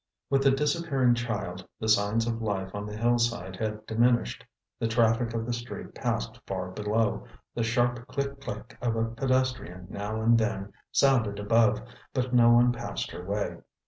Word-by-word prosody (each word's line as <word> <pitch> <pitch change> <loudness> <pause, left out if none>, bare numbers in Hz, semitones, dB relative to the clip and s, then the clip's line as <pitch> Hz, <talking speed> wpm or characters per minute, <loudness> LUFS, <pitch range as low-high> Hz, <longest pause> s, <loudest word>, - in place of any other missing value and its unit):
With 135 0 +4
the 135 - +5
disappearing 140 -2 +2
child, 110 -7 -3 0.2
the 110 - -3
signs 110 +1 +3
of 115 -1 -2
life 95 -3 -2
on 105 0 -4
the 105 0 -6
hillside 115 -5 +1
had 110 0 -3
diminished. 120 - +2 0.4
The 115 - +1
traffic 115 0 +2
of 115 0 -1
the 120 - -2
street 120 +1 -6
passed - - -2
far 95 -1 -3
below, 105 +2 0 0.3
the 120 - -2
sharp 120 +1 +1
click 140 +1 -3
click 110 -1 -7
of 120 -2 0
a 115 0 +1
pedestrian 120 -6 -1
now 105 +2 -3
and 115 +1 +4
then 105 -3 -2 0.2
sounded 120 -7 +3
above, 110 +1 +3 0.3
but 130 -1 -1
no 120 -1 +6
one 120 +1 +6
passed 120 - -4
her 90 - -7
way. 100 +2 -2
115 Hz, 170 wpm, -28 LUFS, 105-120 Hz, 0.4 s, no